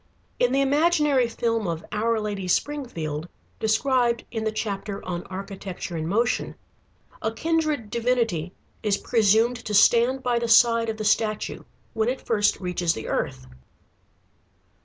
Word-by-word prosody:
In 245 - +3
the 270 +1 +2
imaginary 295 -2 +3
film 230 -2 -1
of 165 -1 -4
Our 225 +2 0
Lady 205 -3 -4
Springfield, 175 - -2 0.3
described 235 +2 +1
in 225 -2 -3
the 220 - +1
chapter 205 -2 -4
on 175 -1 -3
Architecture 190 -2 -6
in 160 -1 -3
Motion, 230 +7 0 0.7
a 220 - -1
kindred 310 -3 -1
divinity 230 -8 0 0.3
is 205 -2 +1
presumed 225 +2 +3
to 215 -3 -4
stand 240 +5 +4
by 245 -1 +1
the 235 - -2
side 230 0 +5
of 220 - -3
the 215 - -4
statue 215 0 0 0.3
when 220 +1 +1
it 260 - -4
first 210 -3 +2
reaches 180 -2 -1
the 110 - -6
earth. 65 0 -2
225 Hz, 140 wpm, -25 LUFS, 195-245 Hz, 0.7 s, side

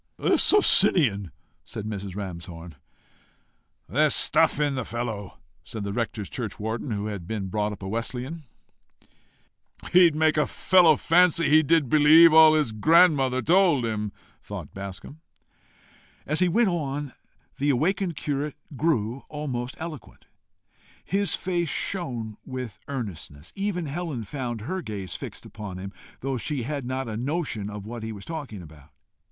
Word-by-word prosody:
"A - - +2
Socinian!" 150 - +4 0.3
said 105 - -7
Mrs. 100 -3 -5
Ramshorn. 85 -3 -7 1.1
"There's - - +2
stuff - - +3
in 145 -1 +1
the 130 -2 -2
fellow!" 110 -5 -5 0.3
said 110 -2 -7
the 100 0 -4
rector's 110 -3 -3
churchwarden, 110 +1 -4
who 105 -2 -2
had 100 -5 -5
been 105 -4 -4
brought 105 +2 -1
up 100 -1 -9
a - - -4
Wesleyan. 125 +8 -4 1.5
"He'd 175 -3 +6
make 155 0 +2
a 150 - +2
fellow 175 -4 +4
fancy 170 0 +3
he 155 +1 +7
did 160 -2 +2
believe 155 +4 +7
all 160 -1 +8
his 150 -7 +1
grandmother 135 0 +4
told 170 -7 +3
him!" 105 -2 -2 0.3
thought - - -8
Bascombe. 100 - -8 1.1
As 155 +2 -1
he 180 -1 +3
went 225 +4 +3
on, 145 -5 -3 0.5
the 145 +2 +1
awakened 175 +6 0
curate 145 0 -3 0.2
grew 130 -5 0
almost 130 -5 -4
eloquent. 160 -4 -9 0.8
His 200 +1 +1
face 175 -3 -2
shone 120 - -3
with 130 -6 -7
earnestness. 95 - -7
Even 195 -4 -2
Helen 150 -4 -4
found 120 0 -5
her 185 - -4
gaze 100 - -6
fixed - - -8
upon 105 -4 -8
him, 95 +1 -7 0.3
though 135 0 -2
she 135 +1 -2
had 140 0 -4
not 130 0 -3
a 110 - -4
notion 130 -4 -3 0.2
what 115 +2 -7
he 110 0 -5
was 100 -2 -9
talking 140 - -6
about. 75 -3 -15
130 Hz, 145 wpm, -25 LUFS, 105-160 Hz, 1.5 s, all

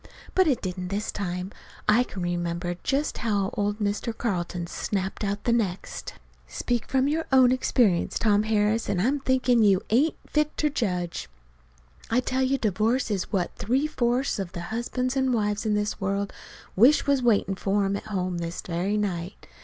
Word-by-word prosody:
But 375 -2 +4
it 270 -6 +1
didn't 180 -1 -3
this 200 +3 -2
time. 180 -1 -4 0.4
I 215 +4 +5
can 190 -7 -6
remember 175 0 -2
just 280 +2 -1
how 205 -4 0
old 205 0 -1
Mr. 210 +2 -2
Carlton 175 -5 -2
snapped 190 +3 -3
out 200 0 -2
the 235 - +1
next. 195 -6 -2 0.3
"Speak 240 - -2
from 265 0 +2
your 320 +3 0
own 260 -2 +6
experience, 235 -7 +2
Tom 210 -2 +3
Harris, 215 +1 +1
an' 185 - 0
I'm 265 +9 +1
thinkin' 255 -3 +2
you 200 -3 +4
ain't 280 +8 +3
fit 300 0 0
ter 300 - +2
judge. 180 - -2 0.8
I 235 - +3
tell 255 +1 -1
you 265 +1 +2
divorce 220 +3 +1
is 195 -3 -2
what 185 -4 0
three 255 +7 +1
fourths 250 -4 0
of 190 -3 -4
the 170 - -5
husbands 250 +3 -2
an' 265 -1 +2
wives 210 -1 0
in 210 - +2
the 210 0 0
world 200 0 -1 0.4
wish 250 +10 +5
was 280 -2 +2
waitin' 215 -5 +2
for 195 +1 0
'em 195 +1 0
at 200 - -5
home 185 -4 -2
this 170 0 -4
very 185 +4 -1
night. 185 -3 -3
210 Hz, 175 wpm, -26 LUFS, 190-250 Hz, 0.8 s, own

